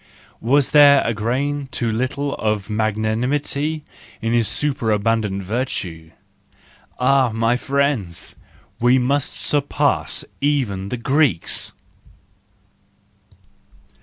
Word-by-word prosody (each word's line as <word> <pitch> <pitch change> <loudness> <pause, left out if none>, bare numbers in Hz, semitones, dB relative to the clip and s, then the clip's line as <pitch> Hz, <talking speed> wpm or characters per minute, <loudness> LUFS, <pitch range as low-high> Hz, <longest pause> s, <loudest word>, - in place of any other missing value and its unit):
Was 135 +4 +2
there 145 -2 +7
a 115 - +1
grain 135 +6 -1
too 120 -3 -1
little 130 +5 -2
of 105 -2 -2
magnanimity 125 +8 -1 0.4
in 115 0 -1
his 115 -2 +2
superabundant 110 -6 0
virtue? 90 -7 -4 0.9
Ah, 130 0 +3
my 115 +2 +1
friends! 135 -10 -1 0.4
We 125 +2 +4
must 135 +2 0
surpass 145 -1 0 0.2
even 120 -10 0
the 125 - -3
Greeks! 130 - +1
125 Hz, 90 wpm, -20 LUFS, 110-140 Hz, 0.9 s, there